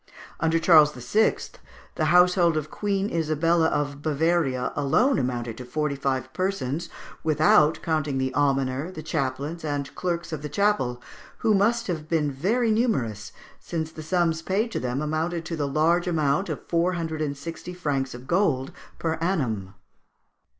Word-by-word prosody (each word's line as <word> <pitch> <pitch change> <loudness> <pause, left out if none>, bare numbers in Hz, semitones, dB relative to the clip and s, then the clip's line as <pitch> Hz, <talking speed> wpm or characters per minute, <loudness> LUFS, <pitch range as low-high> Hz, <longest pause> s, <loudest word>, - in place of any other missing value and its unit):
Under 165 0 +2
Charles 155 -3 +6
VI., 130 - +2 0.6
the - - -1
household 180 -2 +4
of 155 0 -4
Queen 200 -1 -1
Isabella 165 +1 +2
of 145 -2 -2
Bavaria 155 -4 0
alone 215 - +2
amounted 120 -3 -3
to - - -6
forty 150 +3 -1
five 130 -1 -2
persons, 170 -4 -2 0.3
without 155 0 +4
counting 155 -4 0
the 130 0 -1
almoner, 135 +1 +1
the 155 -4 -8
chaplains, 145 +3 -3
and 145 -2 -3
clerks 170 -2 -3
of 150 - -4
the 150 - -5
chapel, 145 -13 0 0.4
who 220 - +5
must 230 +4 +2
have 160 -6 -4
been 150 -3 +1
very 220 - +1
numerous, 130 - 0 0.3
since 160 -2 -4
the 160 - -9
sums 165 0 0
paid 205 +7 -1
to - - -2
them 125 +3 -2
amounted 165 +2 -2
to 165 - -3
the 145 -3 -1
large 165 +5 +2
amount 155 +2 +1
of - - -5
four 170 +2 +1
hundred 160 -2 -3
and 145 -2 -2
sixty 165 +4 -7
francs 140 -7 -2
of 125 +1 -10
gold 145 -6 +1 0.3
per 165 -1 -1
annum. 115 - -1
155 Hz, 155 wpm, -25 LUFS, 140-175 Hz, 0.6 s, Charles